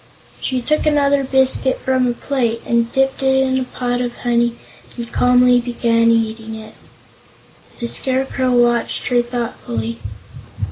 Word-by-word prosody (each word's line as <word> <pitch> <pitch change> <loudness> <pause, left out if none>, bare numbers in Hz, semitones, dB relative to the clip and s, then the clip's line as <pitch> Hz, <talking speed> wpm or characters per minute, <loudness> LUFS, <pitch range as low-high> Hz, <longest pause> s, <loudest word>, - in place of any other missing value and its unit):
She 255 -2 -2
took 305 +3 0
another 285 -2 +2
biscuit 265 0 +2
from 260 -1 +1
a 240 - 0
plate 235 -3 -2
and 235 0 +1
dipped 270 +1 0
it 265 0 +2
in 260 0 0
a - - -1
pot 245 -1 -3
of 245 -1 -3
honey 235 -1 0 0.4
and 235 -1 -6
calmly 250 0 +4
began 230 -1 +1
eating 225 -1 -1
it. 220 0 -10 1.1
The 235 - -3
Scarecrow 260 +1 0
watched 240 +1 +1
her 245 -1 +3
thoughtfully. 120 - -4
245 Hz, 140 wpm, -18 LUFS, 235-260 Hz, 1.1 s, calmly